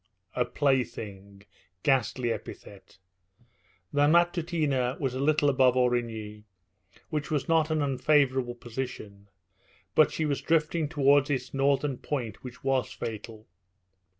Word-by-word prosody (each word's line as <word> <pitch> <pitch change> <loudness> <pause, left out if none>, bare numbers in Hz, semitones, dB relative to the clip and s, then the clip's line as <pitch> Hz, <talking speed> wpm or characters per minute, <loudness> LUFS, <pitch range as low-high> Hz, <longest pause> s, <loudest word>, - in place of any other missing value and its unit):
A - - +1
plaything 110 -8 -2 0.4
ghastly 130 -3 +1
epithet! 100 -3 -9 1.0
The 145 0 +4
Matutina 160 -6 +1
was 135 -3 -1
a 130 - -4
little 150 +1 +2
above 130 -2 +4
Aurigny, 115 -4 -1 0.7
which 150 -1 -2
was 150 -3 -1
not 165 -1 +3
an 155 -2 +1
unfavourable 130 -2 +2
position; 115 -5 -7 0.6
but 155 - +5
she 160 - -2
was 145 -2 -1
drifting 160 -1 +1
towards 145 -1 +3
its 135 -3 -2
northern 135 -1 +1
point, 120 -8 -4
which 125 -2 -10
was 135 -1 0
fatal. 110 -1 -7
135 Hz, 120 wpm, -28 LUFS, 120-150 Hz, 1.0 s, but